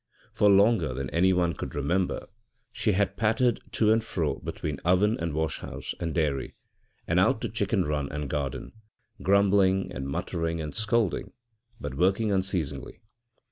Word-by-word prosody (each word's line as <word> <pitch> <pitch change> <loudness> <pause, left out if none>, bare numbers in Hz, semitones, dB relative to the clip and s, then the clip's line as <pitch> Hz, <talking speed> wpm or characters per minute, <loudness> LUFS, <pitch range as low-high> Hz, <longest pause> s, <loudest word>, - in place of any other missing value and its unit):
For 105 - +4
longer 100 - +4
than 65 -1 -4
anyone 90 -1 +2
could - - -6
remember 85 +6 0 0.5
she 105 - 0
had 100 0 0
pattered 115 +2 +2
to 110 -1 +3
and 110 0 +1
fro 80 -9 -2
between 75 -3 -5
oven 95 +5 +3
and 85 -1 -2
wash 80 +1 -2
house - - -6
and 85 -1 -2
dairy, 75 -5 -1 0.5
and - - +2
out - - +3
to - - -2
chicken - - 0
run 75 -2 -2
and 75 -1 -3
garden, 70 -2 -3 0.5
grumbling 95 -1 +3
and 70 0 -4
muttering 85 +2 -2
and 75 -2 -5
scolding, 110 -1 0 0.5
but - - -5
working 95 +8 +2
unceasingly. 90 -8 -2
90 Hz, 150 wpm, -27 LUFS, 75-100 Hz, 0.5 s, For